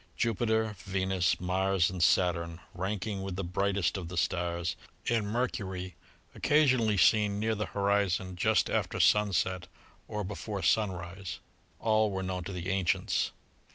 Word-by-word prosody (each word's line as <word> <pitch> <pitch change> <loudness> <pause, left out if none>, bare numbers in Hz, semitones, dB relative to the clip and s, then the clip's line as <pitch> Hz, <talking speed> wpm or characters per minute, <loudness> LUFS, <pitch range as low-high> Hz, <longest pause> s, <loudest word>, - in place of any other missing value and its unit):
Jupiter, 110 -1 +1
Venus, 95 -1 0
Mars 95 0 +1
and 90 -2 -4
Saturn, 85 -1 +2
ranking 100 +2 -3
with 95 -1 -4
the 100 - -3
brightest 95 +1 0
of 90 -3 -5
the 90 +1 -6
stars, 85 0 -1 0.3
and 115 -3 +1
Mercury, 95 -6 -2 0.4
occasionally 130 -8 +3
seen 105 +2 +4
near 110 +1 +1
the 105 0 -2
horizon 100 -2 0
just 90 - +2
after - - -1
sunset 95 -3 +2 0.4
or 105 0 -3
before 100 +1 -5
sunrise, 90 -3 -1 0.4
all 110 -1 +3
were 95 -1 -3
known 95 -1 -3
to - - -5
the 90 0 -4
ancients. 95 -3 +1
95 Hz, 135 wpm, -30 LUFS, 90-105 Hz, 0.4 s, seen